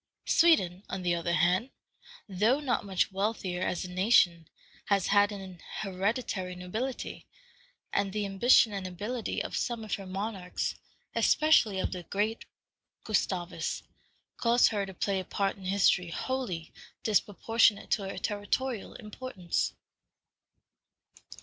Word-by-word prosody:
Sweden, 200 - +4
on 190 - -4
the 175 -1 +2
other 170 0 -1
hand, 185 +9 +2 0.6
though 215 +8 +2
not 265 -5 0
much 195 0 0
wealthier 195 -2 -2
as 185 - -1
a 180 - -8
nation, 180 -4 +3 0.4
has 195 -3 +2
had 205 0 +4
an 190 -3 -8 0.2
hereditary 195 -1 -2
nobility, 220 +9 -5 0.7
and 200 -1 +1
the 210 +1 -1
ambition 205 +3 +5
and 195 -2 -3
ability 210 +6 -3
of - - -5
some 235 -2 -2
of 215 - -5
her 195 -2 -3
monarchs, 195 -1 -3 0.4
especially 305 -10 +4
of - - -1
the 180 - -4
great 210 +6 -2 0.6
Gustavus, 185 -4 -1 0.5
caused 235 +1 +4
her 200 -2 -2
to 190 - -8
play 195 +1 0
a - - -3
part 195 +1 -1
in 190 - -11
history 185 -2 +3
wholly 190 -6 -3 0.3
disproportionate 215 0 +2
to 195 -2 0
her - - -6
territorial 215 +3 -2
importance. 210 -5 -3
200 Hz, 130 wpm, -30 LUFS, 185-225 Hz, 0.7 s, ambition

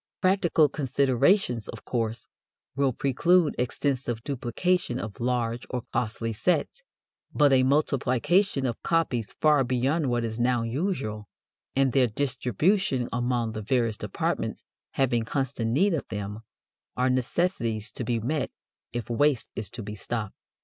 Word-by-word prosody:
Practical 185 -5 +3
considerations, 135 - +2
of - - -9
course, 115 -2 -2 0.5
will 140 -1 +2
preclude 150 +6 +2
extensive 125 -2 -1
duplication 140 +3 -1
of 110 -5 -6
large 120 -1 -1
or 125 -2 -3
costly 115 0 -1
sets, 170 - 0 0.5
but 145 -2 +5
a 130 - +5
multiplication 140 - +2
of 120 -3 -3
copies 140 -10 0
far 150 -3 +4
beyond 130 +4 +1
what 120 -1 0
is 110 0 -4
now 120 -1 +2
usual, 115 - -2 0.5
and 135 -1 +3
their 130 0 +4
distribution 130 - 0
among 120 -1 0
the 110 0 -5
various 115 0 0
departments - - -2 0.3
having 125 -3 +2
constant 130 -1 -2
need 185 - +3
of 155 - -2
them, 105 +1 -5 0.6
are 125 +1 +2
necessities 125 - -1
to - - -5
be 120 0 0
met 145 +7 -1 0.4
if 120 -3 -4
waste 135 +1 +1
is 110 - -4
to 120 -2 -7
be 105 +1 -6
stopped. 105 0 -4
125 Hz, 135 wpm, -27 LUFS, 115-145 Hz, 0.6 s, but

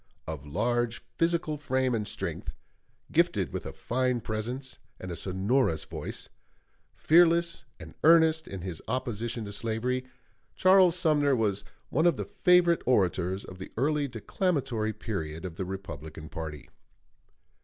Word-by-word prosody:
Of 75 -2 -6
large 120 +8 0 0.2
physical 165 -2 +1
frame 130 -3 0
and 105 -3 -1
strength, - - -4 0.6
gifted - - +2
with - - -4
a - - -5
fine 125 0 0
presence 120 +4 -4 0.2
and 95 - -6
a - - -4
sonorous 95 - 0
voice, - - -6 0.7
fearless 170 +1 +4
and - - -10
earnest 160 0 +5
in 95 -2 -6
his 90 -3 -5
opposition 120 -2 -2
to 100 - -6
slavery, 120 +4 -1 0.5
Charles 185 -2 +6
Sumner 150 -5 +3
was 105 -4 0 0.3
one 160 +6 +3
of 170 - +4
the - - -4
favorite 180 -4 +4
orators 95 -4 +1
of 95 - -11
the 95 - -8
early 145 +3 +1
declamatory 125 - -1
period 95 -7 -5
of 85 -2 -7
the 95 - -2
Republican 80 -5 -7
party. 75 -5 -6
120 Hz, 135 wpm, -29 LUFS, 95-150 Hz, 0.7 s, Charles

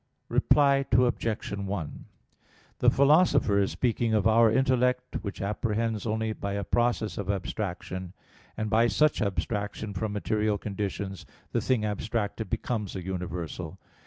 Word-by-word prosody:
Reply 140 -2 +4
Obj. 120 -2 +1
1: 100 -6 -5 0.7
The 125 - +6
Philosopher 140 - +4
is 100 - +2
speaking 115 -2 0
of 105 - +2
our 110 0 +5
intellect, 125 0 +1
which 100 -2 -5
apprehends 110 +1 -1
only 110 0 -1
by 100 -1 -4
a 100 0 -2
process 120 0 0
of 100 -1 -4
abstraction; 95 -2 -3 0.4
and 110 - -1
by 115 +2 +4
such 150 +3 +2
abstraction 105 +1 -2
from 105 +2 -2
material 105 0 0
conditions 100 -1 -4 0.2
the - - 0
thing 125 -5 +1
abstracted 105 +1 -2
becomes 110 -3 -2
a 95 - -4
universal. 90 -2 -5
110 Hz, 130 wpm, -28 LUFS, 100-120 Hz, 0.7 s, The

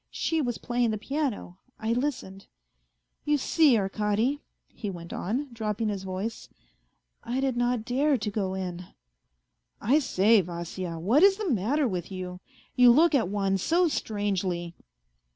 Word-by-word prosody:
She 325 -1 -1
was 245 -4 -2
playing 240 -1 0
the 215 - -1
piano, 240 - -3 0.2
I 225 +1 0
listened. 240 -7 -3 0.8
You 295 0 +2
see, 285 -2 +4
Arkady," 210 +7 0 0.3
he 210 - -6
went 170 -3 -8
on, 255 +10 -2
dropping 220 -1 -2
his 200 -2 -3
voice, 190 +4 -5 0.4
" 60 - -46 0.3
I 245 +3 -2
did 265 -2 0
not 245 -2 0
dare 270 +3 +2
to 210 -2 -3
go 195 -2 -2
in." 180 -2 -5 0.5
" - - -52 0.2
I - - +6
say, 215 -5 +4
Vasya 170 0 -5
what 215 - +3
is 390 0 +6
the 420 -6 -2
matter 255 +7 +1
with 180 -3 -4
you? 180 -1 -6 0.4
You 250 -1 +7
look 320 +6 +5
at 230 -10 +2
one 195 -1 0
so 340 - +2
strangely." 195 - -2
215 Hz, 155 wpm, -27 LUFS, 185-260 Hz, 0.8 s, You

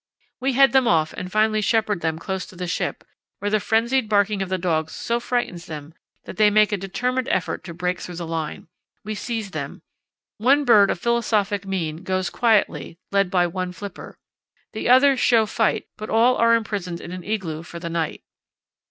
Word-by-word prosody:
We 265 +1 0
head 270 +2 +5
them 265 -2 +4
off 155 -4 +2
and 180 0 -6
finally 215 +1 +2
shepherd 210 -3 +1
them 160 -1 -1
close 190 +3 -4
to - - -14
the 180 0 -4
ship, 175 - -3 0.3
where 205 0 -3
the 215 - +3
frenzied 225 +3 +1
barking 205 -1 +2
of 190 - -3
the 185 - 0
dogs 160 -3 -1
so 235 0 -1
frightens 240 -8 -2
them 150 0 -8 0.3
that - - -9
they 215 -1 +6
make 215 0 +4
a 205 - 0
determined 250 +7 -2
effort 185 - -1
to 170 - -7
break 180 +1 -2
through 180 - -7
the 170 0 -5
line. 160 -2 -4 0.4
We 215 - -4
seize 220 -2 -4
them. - - -6 0.6
One 275 +6 +4
bird 205 -5 +6
of - - 0
philosophic 210 -3 0
mien 165 -5 -2
goes 185 0 -2
quietly, 220 -7 +1
led 200 -2 +2
by 180 -1 +3
one 180 +1 -3
flipper. 200 0 -9 0.6
The 220 - -2
others 260 +1 +6
show 230 -2 +4
fight, 225 +1 0
but 215 - -7
all 235 +3 +4
are 230 0 +5
imprisoned 200 -6 -3
in - - -9
an 180 -1 -7
igloo 180 -7 -3
for 170 0 -10
the 170 0 -6
night.... 165 -2 -2
200 Hz, 195 wpm, -23 LUFS, 180-225 Hz, 0.6 s, they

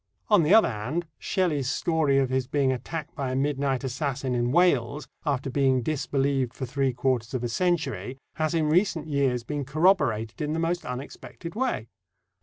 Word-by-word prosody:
On 210 -4 +6
the 155 +2 +2
other 225 - +6
hand, 130 +12 -3
Shelley's 150 -8 0
story 155 -2 +1
of 135 -2 +2
his 130 -1 0
being 135 -1 +1
attacked 145 +5 -5
by 140 -4 -3
a - - -2
midnight 135 -1 0
assassin 135 0 -2
in 120 0 0
Wales, 150 -4 +2 0.2
after 135 -2 -1
being 130 -2 +2
disbelieved 135 -3 0
for 130 - -4
three 135 +1 0
quarters 125 -1 -1
of 125 - -2
a - - 0
century, 165 -2 -1 0.2
has 155 +1 0
in 160 -2 +2
recent 165 -1 +2
years 140 -5 0
been 145 +3 -3
corroborated 135 - +1
in 150 0 -1
the 160 - -1
most 170 +1 -1
unexpected 140 +6 -7
way. 230 - -1
140 Hz, 175 wpm, -26 LUFS, 130-160 Hz, 0.2 s, On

